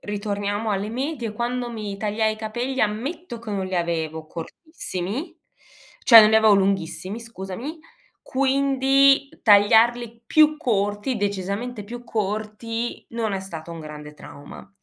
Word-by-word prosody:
ritorniamo 205 +1 -3
alle 200 +1 -1
medie 250 -2 -3
quando 240 +2 -3
mi 210 -3 -5
tagliai 215 +1 0
i - - -16
capelli, 240 +5 -3
ammetto 240 +7 -2
che 225 -1 -8
non 195 -2 -2
li 185 -1 -3
avevo 160 -2 -2
cortissimi 235 - -6 0.7
cioè 230 -3 +10
non 215 0 +6
li 220 - +5
avevo 220 -1 +6
lunghissimi 195 +1 -1
scusami, 230 - -7 0.4
quindi 275 0 +3
tagliarli 230 +3 +4
più 305 +2 +4
corti, 205 -3 -1
decisamente 205 +3 -3
più 240 +3 -9
corti, 220 +2 -4
non 230 -2 -2
è - - -1
stato 170 -4 -8
un 165 - -8
grande 150 -1 -9
trauma; 145 +4 -12
220 Hz, 135 wpm, -23 LUFS, 200-245 Hz, 0.7 s, cioè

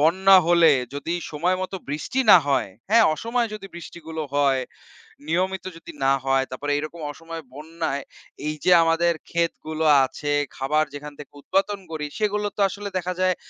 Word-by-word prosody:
বন্যা 190 +5 +6
হলে 170 -2 +6 0.2
যদি 160 +4 -3 0.2
সময়মত 185 +5 -1 0.2
বৃষ্টি 155 - -2
না 180 - +10
হয়, 135 -8 +1 0.2
হ্যাঁ, 225 0 +6
অসময়ে 230 +4 -2
যদি 205 -2 -8
বৃষ্টিগুলো 160 -1 -7
হয়, 140 -2 +3 0.7
নিয়মিত 185 +3 -1
যদি 170 - -11
না 135 - +5
হয়, 135 0 +2
তারপরে 145 +3 -3
এইরকম 155 +3 -6
অসময়ে 165 +2 -9
বন্যায় 155 -1 -4 0.4
এই 155 - -2
যে 180 - +3
আমাদের 165 +1 +2 0.2
ক্ষেতগুলো 160 -2 -2 0.2
আছে, 145 +3 -5 0.3
খাবার 150 +4 +1
যেখান 145 0 -8
থেকে 145 - -11
উৎপাদন 200 +4 0
করি, 150 -2 -4
সেগুলো 210 -1 0
তো 205 - 0
আসলে 205 +2 -6
দেখা 180 0 -2
যায় 185 -1 +3
165 Hz, 155 wpm, -23 LUFS, 150-185 Hz, 0.7 s, না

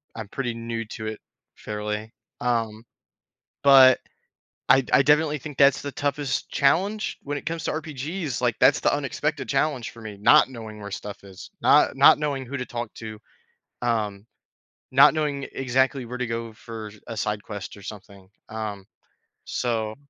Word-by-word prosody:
I'm 110 -2 -6
pretty 120 -1 -3
new 115 0 -4
to 110 0 -8
it 110 0 -6 0.3
fairly, 105 +1 -5 0.3
um, 115 -3 -1 0.8
but 135 -2 +8 0.7
I 135 - +6
I - - +6
definitely 150 +1 +3
think 150 0 -9
that's 140 -1 +5
the 140 -1 -5
toughest 145 -1 -2
challenge 195 +10 +1
when 145 0 -3
it - - -13
comes 165 0 -3
to - - -1
RPGs, 155 0 -4
like, 120 -2 +1
that's - - +5
the - - +2
unexpected - - -2
challenge 135 -7 0
for 115 - -14
me, 105 -2 -8
not 105 - +6
knowing 110 -4 -9
where 100 0 -7
stuff 100 0 -7
is, 95 -1 -11
not - - +5
not - - +7
knowing 145 -3 -2
who 140 +3 -5
to 125 - -4
talk 120 -2 -5
to, 110 -1 -8 0.6
um, 105 -4 -1 0.7
not - - +7
knowing 145 -3 -1
exactly 130 0 +1
where 125 +2 -6
to 125 - -1
go 115 0 -4
for 110 -1 -8 0.2
a 115 - -5
side 105 0 -2
quest 105 -2 -7
or 100 - -13
something, 100 -1 -11 0.2
um, 105 -3 -5 0.6
so 110 -3 -2
120 Hz, 165 wpm, -25 LUFS, 110-140 Hz, 0.8 s, but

